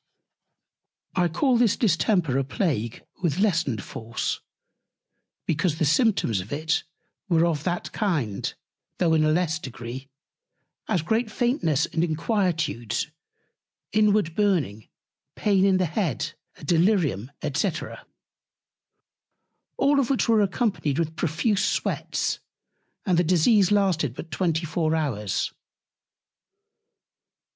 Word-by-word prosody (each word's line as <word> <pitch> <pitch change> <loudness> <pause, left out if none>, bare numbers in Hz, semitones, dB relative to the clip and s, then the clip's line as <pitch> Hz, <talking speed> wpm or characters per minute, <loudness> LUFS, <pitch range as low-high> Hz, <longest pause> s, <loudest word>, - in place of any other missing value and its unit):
I 180 -1 +3
call 245 - +2
this 230 -4 +3
Distemper 175 - +2
a - - +1
Plague 130 - -2 0.2
with 165 -4 0
lessened 165 - +1
Force, 115 +2 -4 1.1
because 160 0 0
the 160 - +1
Symptoms 150 - +2
of 95 - -11
it 155 +3 0 0.5
were 165 -1 +4
of 155 -4 -1
that 175 -1 -2
kind, 150 - -1 0.5
though 170 -3 +2
in 155 -1 +4
a 155 - +3
less 160 -1 +1
Degree; 130 -2 -7 0.8
as 175 - 0
great 220 +5 0
Faintness 215 - +1
and 165 - -1
Inquietudes, 160 - -1 0.8
inward 210 -5 +3
Burning, 165 - 0 0.5
Pain 200 -3 +2
in 195 -1 +4
the 185 - +2
Head, 170 - -2 0.2
a - - -15
Delirium 160 - +2 0.2
&c. 175 +7 +1 2.1
All 280 0 +4
which 260 +1 0
were 225 -2 +4
accompanied 195 - 0
with 160 -1 -1
profuse 190 +6 0
Sweats, - - -1 0.7
and 180 -4 +3
the - - +4
Disease 185 +4 +4
lasted 180 - +2
but 165 - -8
24 165 -2 0
hours. 110 - -1
170 Hz, 110 wpm, -25 LUFS, 150-200 Hz, 2.1 s, were